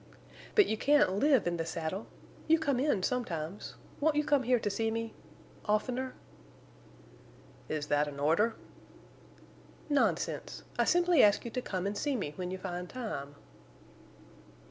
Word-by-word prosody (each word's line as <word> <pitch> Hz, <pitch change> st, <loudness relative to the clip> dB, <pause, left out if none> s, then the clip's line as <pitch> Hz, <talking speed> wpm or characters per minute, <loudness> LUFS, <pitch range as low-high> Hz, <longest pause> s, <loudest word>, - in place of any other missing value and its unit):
"But 415 Hz, -, +7 dB
you 220 Hz, -, -1 dB
can't 290 Hz, -5 st, +4 dB
live 275 Hz, -1 st, +4 dB
in 175 Hz, 0 st, 0 dB
the 165 Hz, -, -1 dB
saddle. 165 Hz, +4 st, -4 dB, 0.4 s
You 325 Hz, +1 st, +6 dB
come 285 Hz, -5 st, 0 dB
in 260 Hz, -9 st, +1 dB
sometimes. 190 Hz, -8 st, -3 dB, 0.2 s
Won't 310 Hz, +1 st, +2 dB
you 300 Hz, -, +2 dB
come 290 Hz, -2 st, +3 dB
here 250 Hz, 0 st, +3 dB
to 215 Hz, -, -3 dB
see 225 Hz, +3 st, 0 dB
me—oftener?" 230 Hz, +2 st, -4 dB, 1.5 s
"Is 150 Hz, -1 st, -2 dB
that 145 Hz, 0 st, +2 dB
an 140 Hz, -1 st, -7 dB
order?" 170 Hz, +11 st, +2 dB, 1.3 s
"Nonsense! 290 Hz, -1 st, 0 dB, 0.2 s
I -, -, +4 dB
simply 350 Hz, -3 st, +4 dB
ask 205 Hz, +2 st, +4 dB
you 235 Hz, -, -5 dB
to 250 Hz, -, -2 dB
come 185 Hz, -5 st, -3 dB
to 200 Hz, -, -1 dB
see 280 Hz, +6 st, -1 dB
me 150 Hz, -11 st, -3 dB
when 180 Hz, +1 st, -4 dB
you 185 Hz, -, -4 dB
find 180 Hz, -1 st, -5 dB
time." 145 Hz, -, -5 dB
220 Hz, 145 wpm, -31 LUFS, 175-265 Hz, 1.5 s, But